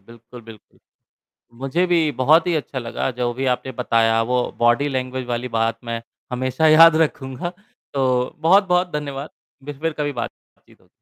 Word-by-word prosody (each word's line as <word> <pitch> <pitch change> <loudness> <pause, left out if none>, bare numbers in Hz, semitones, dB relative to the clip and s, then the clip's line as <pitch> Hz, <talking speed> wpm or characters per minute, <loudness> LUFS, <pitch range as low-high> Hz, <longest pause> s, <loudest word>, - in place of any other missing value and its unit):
बिल्कुल, 115 +3 -14
बिल्कुल। 110 -2 -16 0.8
मुझे 135 +8 0
भी 170 -3 +2
बहुत 160 +6 +4
ही 175 - +1
अच्छा 145 -3 -3
लगा, 120 +2 -3
जो 125 -1 -2
भी 135 +1 -3
आपने 130 - -9
बताया, 115 -2 +2
वो 125 +2 0 0.2
बॉडी 120 +5 +3
लैंग्वेज 130 -1 -3
वाली 120 +1 -3
बात 115 0 0
मैं 115 0 -4 0.3
हमेशा 130 +4 0
याद 160 +1 +8
रखूँगा। 135 +2 -5 0.4
तो 130 -2 +1
बहुत-बहुत 180 +2 +3
धन्यवाद। 145 -1 -5 0.3
बिर 145 -1 -8
फिर 165 0 -1
कभी 145 -1 -3
बात-चीत 120 -2 -10
हो - - -28
130 Hz, 160 wpm, -21 LUFS, 120-155 Hz, 0.8 s, याद